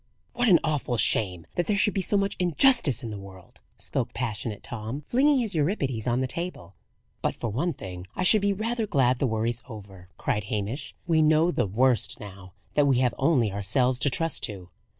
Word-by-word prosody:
"What 245 -1 +1
an 180 - +8
awful 145 -6 -1
shame 90 -7 +2
that 175 - -1
there 210 - +1
should 205 +1 +2
be 195 - 0
so 205 - +2
much 200 0 0
injustice 175 - +3
in 115 - -5
the 105 - -6
world!" 95 -2 -14 0.2
spoke - - -3
passionate 110 -3 -4
Tom, 120 +6 -6
flinging 280 +3 +3
his 225 -5 +1
Euripides 145 - -1
on 120 +1 +1
the 130 - 0
table. 130 - -5 0.5
"But - - -1
for 115 - -4
one 155 - -1
thing, 90 -4 -8
I 185 - -1
should 210 +3 +4
be 200 0 +2
rather 225 +3 -2
glad 130 -6 +2
the 135 - +1
worry's 115 +1 -1
over," 100 -5 -11
cried 105 -1 -2
Hamish. 105 +7 -4
"We 165 -3 +3
know 155 +2 +4
the 105 - 0
worst 120 +5 +2
now 95 -3 -11 0.2
that 145 -1 +3
we 135 -3 +3
have 125 -2 +2
only 130 -7 +2
ourselves 125 +6 0
to 145 - +2
trust 165 +5 -1
to." 95 -5 -9
130 Hz, 200 wpm, -26 LUFS, 105-175 Hz, 0.5 s, an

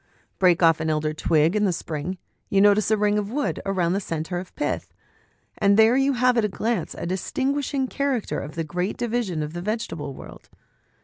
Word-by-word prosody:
Break 180 -2 +4
off 165 -1 +5
an 160 0 -1
elder 155 0 0
twig 160 +2 +2
in 210 0 +2
the 190 - +2
spring; 165 +2 -4 0.3
you 195 - +2
notice 205 +1 +4
a 220 - +3
ring 210 0 +2
of 205 -1 -4
wood 290 +3 -1
round 185 -2 +1
a - - +1
centre 165 -1 -3
of 180 - -10
pith, 295 - -3 0.6
and 200 0 +4
there 220 +2 +6
you 270 +1 +3
have 250 0 +3
at - - +1
a - - -1
glance 215 -2 -2
a - - -5
distinguishing 270 - -1
character 275 -4 -1
of 150 +3 -8
a 165 - 0
great 180 +5 -3
division 230 -9 -1
of 150 +1 -6
the 175 - -5
vegetable 170 - -4
world. - - -12
195 Hz, 200 wpm, -24 LUFS, 165-230 Hz, 0.6 s, there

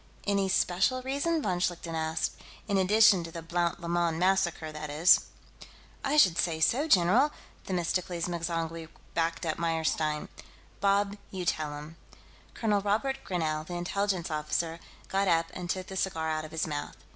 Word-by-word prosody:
"Any 200 -1 +1
special 190 +8 +2
reason?" 285 +4 0
von 180 -3 0
Schlichten 175 -2 -2
asked. 160 0 -1 0.4
"In 200 -2 +2
addition 205 -1 +5
to 165 - -8
the 165 0 -7
Blount 170 +1 -1
Lemoyne 170 -1 0
massacre, 180 -3 +1
that 155 0 -6
is?" 160 +5 +5 0.8
"I 285 +2 +1
should 180 - +5
say 160 -1 0
so, 255 - +2
general!" 230 - +4 0.3
Themistocles 175 -1 -1
M'zangwe 165 -1 -3 0.2
backed 165 0 -1
Meyerstein 160 -2 0
up. - - -12 0.5
"Bob, 200 +1 +2
you 185 -2 -5
tell 150 -3 -1
him." 155 +3 -10 0.6
Colonel 210 -3 +1
Robert 220 +7 0
Grinell, 155 -4 -1
the 175 +2 -7
Intelligence 185 0 -1
officer, 160 +2 -2 0.3
got 195 +1 0
up 165 -1 +2
and 180 -1 -6
took 185 +2 -2
the 190 - -8
cigar 165 -4 -1
out 155 0 -2
of 155 - -10
his 160 0 -1
mouth. 145 -2 -5
175 Hz, 155 wpm, -29 LUFS, 160-195 Hz, 0.8 s, addition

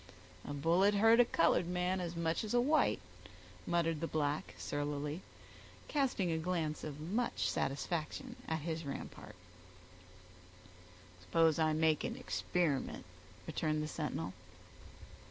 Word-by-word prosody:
"A - - -6
bullet 170 +8 +3
hurt 225 +3 +6
a 245 - +8
colored 170 -3 +3
man 180 +1 0
as 175 -1 -4
much 165 +2 0
as 215 +2 -1
a - - +6
white," 295 +5 +3 0.7
muttered 165 -2 +1
the 165 - 0
black, 150 -1 -1
surlily, 145 +2 -3 0.7
casting 255 - +1
a 160 - 0
glance 160 -3 -1
of 150 -1 -5
much 210 +10 -1
satisfaction 155 +3 -2
at 160 -1 -1
his 160 +1 -3
rampart. 140 - -7 1.9
"Suppose 160 - +3
I 155 -1 +3
make 155 0 +3
the 235 +3 -3
experiment," 175 - -1 0.4
returned 155 -1 -1
the - - -2
sentinel. - - -3
165 Hz, 125 wpm, -35 LUFS, 155-180 Hz, 1.9 s, a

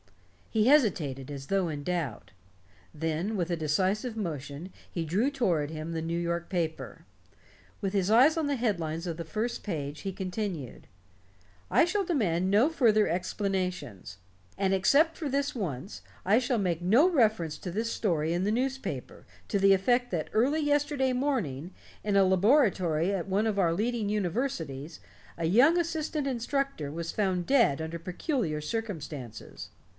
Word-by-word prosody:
He 220 -1 +2
hesitated, 160 - +2
as 135 -1 -7
though 195 -3 +1
in 145 -2 -5
doubt. 165 -9 -3 0.6
Then, 160 +7 -2
with 175 -1 -1
a - - +2
decisive 190 - 0
motion, 155 -2 -5 0.2
he 170 -2 -3
drew 200 - +1
toward 175 - 0
him 155 +1 -5
the 165 -1 -2
New 165 +1 -2
York 170 0 -2
paper. 165 -4 -3 0.7
With 195 -1 -2
his 195 0 +1
eyes 260 +8 +6
on 320 -3 0
the 285 -1 0
head 225 -5 +1
lines 165 +1 -4
of 170 - -2
the 170 - -5
first 215 +8 -3
page, 150 -6 -4
he 195 - -3
continued: 185 - -5 0.8
"I - - +5
shall 395 +3 0
demand 190 - 0
no 210 +7 +5
further 230 -9 +3
explanations. 180 - -3 0.4
And 195 -1 +1
except 280 - +4
for 300 - -4
this 280 +1 -1
once, 180 - -5 0.2
I 200 +4 +5
shall 250 -1 0
make 175 -5 0
no 225 - +5
reference 215 - +2
to 180 - -5
this 225 +5 -2
story 165 -6 0
in 175 +2 0
the 205 - +1
newspaper, 250 - -3 0.2
to 200 - +1
the 195 0 +5
effect 245 +6 +2
that 165 -4 -2
early 275 +8 +2
yesterday 290 -3 +1
morning, 210 - -1 0.3
in 205 -1 +1
a 195 - +6
laboratory 190 - +3
at 190 -2 -2
one 200 +3 +1
of 205 -2 0
our 170 -3 +3
leading 215 +3 -1
universities, 175 - -2 0.4
a 165 - -2
young 250 - +5
assistant 315 -3 -1
instructor 260 - -2
was 165 +1 -4
found 185 -4 0
dead 235 - +3
under 160 +1 -4
peculiar 180 - -2
circumstances." 150 - -6
190 Hz, 160 wpm, -29 LUFS, 165-240 Hz, 0.8 s, eyes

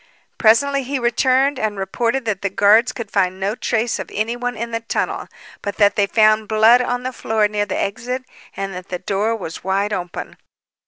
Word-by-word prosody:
Presently 275 +5 +4
he 270 +2 -3
returned 260 +3 +2
and 215 -3 -2
reported 230 +6 -1
that 210 -4 -2
the 200 - -1
guards 205 +5 +4
could 230 -4 -7
find 185 -2 +1
no 195 +2 -1
trace 230 0 -1
of - - -6
anyone 240 +3 -2
in 235 +1 -4
the 230 - -1
tunnel, 230 - -3 0.3
but 205 -1 -4
that 205 -1 +4
they 200 -1 +2
found 215 0 +3
blood 220 +3 +5
on 245 0 -2
the 255 0 -3
floor 220 -3 +1
near 205 0 -2
the - - -2
exit 250 +6 -3 0.3
and 195 0 -3
that 180 +1 -8
the 180 - -2
door 205 +5 -1
was 170 -7 -7
wide 195 +3 0
open. 180 0 -5
220 Hz, 195 wpm, -20 LUFS, 200-245 Hz, 0.3 s, blood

